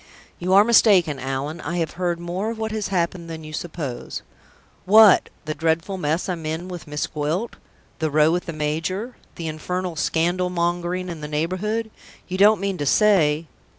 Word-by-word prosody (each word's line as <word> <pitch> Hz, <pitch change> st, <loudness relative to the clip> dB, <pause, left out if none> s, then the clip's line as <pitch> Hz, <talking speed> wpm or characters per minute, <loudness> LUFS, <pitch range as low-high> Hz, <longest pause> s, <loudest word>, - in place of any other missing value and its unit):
"You 185 Hz, +2 st, 0 dB
are 200 Hz, +1 st, +8 dB
mistaken, 195 Hz, -, +4 dB
Allan. 135 Hz, +5 st, -4 dB
I 170 Hz, +4 st, -3 dB
have 165 Hz, -2 st, -1 dB
heard 175 Hz, -1 st, -2 dB
more 180 Hz, +5 st, -3 dB
of 230 Hz, -, -5 dB
what 220 Hz, 0 st, -3 dB
has 215 Hz, -2 st, -2 dB
happened 170 Hz, -2 st, -2 dB
than 160 Hz, -1 st, -7 dB
you 155 Hz, 0 st, -9 dB
suppose." 155 Hz, -6 st, -5 dB, 0.6 s
"What! 210 Hz, +1 st, +7 dB, 0.2 s
the 155 Hz, -, -2 dB
dreadful 165 Hz, +5 st, -1 dB
mess 160 Hz, +1 st, -1 dB
I'm 175 Hz, -3 st, -3 dB
in 160 Hz, +3 st, -3 dB
with 175 Hz, -3 st, -8 dB
Miss 150 Hz, 0 st, -2 dB
Gwilt? 160 Hz, +9 st, -3 dB, 0.4 s
the 160 Hz, -1 st, 0 dB
row 150 Hz, +2 st, +4 dB
with 175 Hz, +2 st, -1 dB
the -, -, -2 dB
major? 160 Hz, +10 st, -2 dB, 0.2 s
the 165 Hz, -, -5 dB
infernal 180 Hz, +3 st, -3 dB
scandal 175 Hz, +3 st, 0 dB
mongering 175 Hz, +1 st, -1 dB
in 170 Hz, -3 st, -6 dB
the 150 Hz, -, -5 dB
neighborhood? 185 Hz, +9 st, -2 dB, 0.4 s
You 185 Hz, 0 st, -4 dB
don't 210 Hz, +1 st, +6 dB
mean 195 Hz, -1 st, -2 dB
to 145 Hz, -, -1 dB
say 165 Hz, -6 st, +3 dB
175 Hz, 180 wpm, -23 LUFS, 155-190 Hz, 0.6 s, are